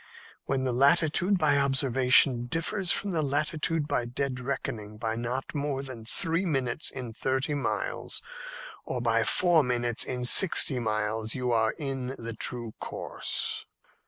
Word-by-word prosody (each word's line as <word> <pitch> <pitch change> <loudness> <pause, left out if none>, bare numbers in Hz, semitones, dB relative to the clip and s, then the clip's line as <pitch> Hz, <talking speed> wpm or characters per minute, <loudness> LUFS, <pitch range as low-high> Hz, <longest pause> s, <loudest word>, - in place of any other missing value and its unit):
When 135 -1 -1
the 130 -2 -1
latitude 160 +8 +3
by 145 -4 +3
observation 130 -2 +4
differs 175 - 0
from 200 - 0
the 165 -3 0
latitude 150 +2 0
by 120 - -1
dead 130 +2 -3
reckoning 115 -5 -5
by 110 0 -2
not 120 +3 -4
more 140 -2 -2
than 125 -5 -7
three 165 +8 +1
minutes 135 -5 -1
in 125 -4 -7
thirty 130 +5 -1
miles, 120 -7 -3 0.6
or 125 - -3
by 115 -1 +2
four 175 +2 +4
minutes 120 -3 -1
in 125 -1 -4
sixty 140 -2 +5
miles, 110 0 -2
you 125 -2 -1
are 110 -1 +2
in 135 -3 -4
the 115 0 -5
true 120 -1 -2
course." - - -3
130 Hz, 145 wpm, -28 LUFS, 120-145 Hz, 0.6 s, sixty